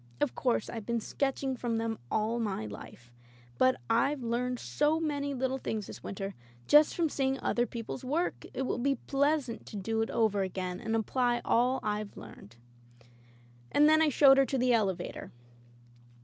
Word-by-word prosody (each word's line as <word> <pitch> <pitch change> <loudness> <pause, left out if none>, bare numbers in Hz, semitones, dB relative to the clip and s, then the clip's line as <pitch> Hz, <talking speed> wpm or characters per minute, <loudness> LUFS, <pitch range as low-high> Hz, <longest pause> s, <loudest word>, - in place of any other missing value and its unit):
Of 290 - 0
course, 245 -4 0
Tve 225 -2 -6
been 235 -1 0
sketching 270 +3 -2
from 235 -2 -2
them 225 -1 -2
all 220 +2 0
my 200 - -2
life, 120 +3 -10 0.5
but 255 0 +5
Fve 255 +4 +1
learned 245 +2 -1
so 300 +5 +1
many 285 -3 -2
little 260 +1 -1
things 215 -4 -3
this - - -10
winter, 195 0 -5 0.3
just 300 +1 +6
from 335 -2 +2
seeing 270 -2 -1
other 240 0 +1
people's 230 +3 -6
work 305 +7 -2
— - - -22
^it 265 - -1
will 255 - -2
be 275 +3 +1
pleasant 280 -3 -1
to - - -9
do 225 +3 -1
it 225 - -1
over 215 -3 +1
again, 185 -1 -3
and 225 +2 -2
apply 240 +2 +1
all 250 +3 +2
Fve 210 -1 -3
learned." 110 0 -12 1.2
And 295 +1 +5
then 315 +1 +5
I 315 - +4
showed 275 -1 +6
her 275 - +5
to 270 - -1
the 250 0 +3
elevator. 200 -6 -1
240 Hz, 175 wpm, -30 LUFS, 220-275 Hz, 1.2 s, just